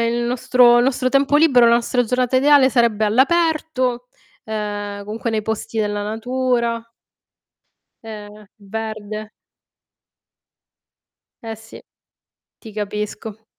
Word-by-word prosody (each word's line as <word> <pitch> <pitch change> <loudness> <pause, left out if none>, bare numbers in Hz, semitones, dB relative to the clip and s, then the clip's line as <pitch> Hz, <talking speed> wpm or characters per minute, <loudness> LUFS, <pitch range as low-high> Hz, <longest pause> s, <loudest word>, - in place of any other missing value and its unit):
il 240 +1 -1
nostro 240 0 +4
il 240 - +3
nostro 255 -1 0
tempo 275 +2 +2
libero, 270 -6 +5
la 235 - +5
nostra 245 +1 +1
giornata 250 +2 0
ideale 275 0 +5
sarebbe 230 -3 +2
all'aperto, 260 -1 +1 0.4
ehm, 205 -2 -5
comunque 225 +3 -4
nei 215 -1 -1
posti 220 +1 -4
della 205 -1 -1
natura. 235 +1 -1 1.2
Ehm, 210 -1 -10
verde. 215 0 -6 2.1
Ehm, 225 -1 -6
sì, 220 +1 -14 0.8
ti 220 -3 -12
capisco. 210 +1 -6
230 Hz, 105 wpm, -20 LUFS, 215-255 Hz, 2.1 s, libero